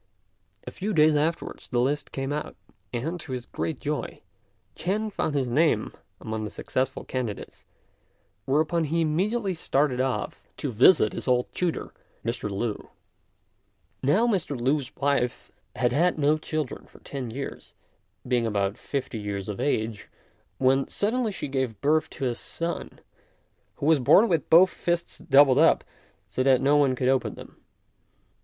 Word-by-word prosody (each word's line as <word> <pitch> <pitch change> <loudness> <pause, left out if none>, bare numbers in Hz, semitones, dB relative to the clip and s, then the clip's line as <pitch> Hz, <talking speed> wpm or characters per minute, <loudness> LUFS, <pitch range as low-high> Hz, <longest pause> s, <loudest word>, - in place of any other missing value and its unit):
A - - -6
few 205 +3 -3
days 155 0 +5
afterwards 160 +3 -2
the 120 - 0
list 140 +4 0
came 135 +1 -3
out, 150 - -4 0.4
and, 155 +9 -3
to 140 -4 -7
his 125 -1 -4
great 160 -5 -4
joy, 150 0 -4 0.5
Ch'ên 210 +5 -1
found 150 - -1
his 135 -3 +1
name 125 -3 +2 0.3
among 110 0 -4
the 105 - -4
successful 130 +4 -2
candidates; 120 -6 -5 0.8
whereupon 155 +4 +1
he 165 +3 0
immediately 190 +6 0
started 140 -5 +1
off 130 -1 -3
to - - -3
visit 120 - +5
his - - -5
old 125 -1 +1
tutor, 175 -2 -2 0.3
Mr. 115 -2 -2
Lü. 105 +2 -3 1.1
Now 170 - +3
Mr. 185 - -1
Lü's 135 +2 0
wife 140 -3 -1 0.2
had 125 -1 +1
had 170 +7 +2
no 150 0 +3
children 155 -3 -4
for - - -18
ten 135 -4 -5
years, 135 +5 -7 0.5
being 120 -2 +1
about 100 0 -1
fifty 130 -5 -4
years 100 -2 -4
of 105 -2 -5
age, 110 -6 -1 0.5
when 135 +1 +3
suddenly 225 +2 0
she 195 - -5
gave 130 -6 -2
birth 155 +4 +2
to 135 - -3
a 125 - +1
son, 170 +7 -5 0.7
who - - -5
was 160 -1 +5
born 195 - +6
with 165 - 0
both 180 +3 +7
fists 170 0 -2
doubled 140 -3 +5
up 165 - +5 0.4
so 105 +5 -2
that 130 -1 +4
no 140 +2 +3
one 140 -3 +3
could 125 0 -1
open 130 -1 +1
them. - - -12
140 Hz, 155 wpm, -26 LUFS, 125-160 Hz, 1.1 s, both